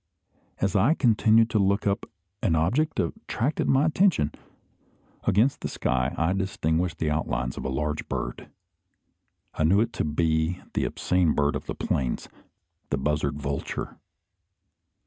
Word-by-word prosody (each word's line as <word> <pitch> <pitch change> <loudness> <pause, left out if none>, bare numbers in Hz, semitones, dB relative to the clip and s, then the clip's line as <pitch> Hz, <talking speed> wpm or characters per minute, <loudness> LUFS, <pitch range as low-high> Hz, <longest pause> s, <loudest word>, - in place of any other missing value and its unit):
As 100 0 0
I 115 - +4
continued 115 -3 +4
to 110 - +2
look 100 +1 +2
up, 100 0 -1 0.3
an 85 -7 +2
object 120 - +1
attracted 150 - -1
my 135 +3 +4
attention. 160 - +2 0.9
Against 115 +8 +2
the - - -2
sky 65 +1 -1
I 80 +4 +1
distinguished 90 -3 -1
the 80 -2 0
outlines 60 -5 -1
of - - -6
a - - -1
large 75 +3 -2
bird. - - -4 1.0
I - - -1
knew 90 +6 +4
it 115 +1 0
to - - -1
be 80 +3 0
the - - 0
obscene 90 -4 +1
bird 70 0 +1
of - - -5
the - - -3
plains, 65 -3 -2 0.6
the 70 - 0
buzzard 75 +1 -1
vulture. 70 0 -4
85 Hz, 145 wpm, -26 LUFS, 75-110 Hz, 1.0 s, I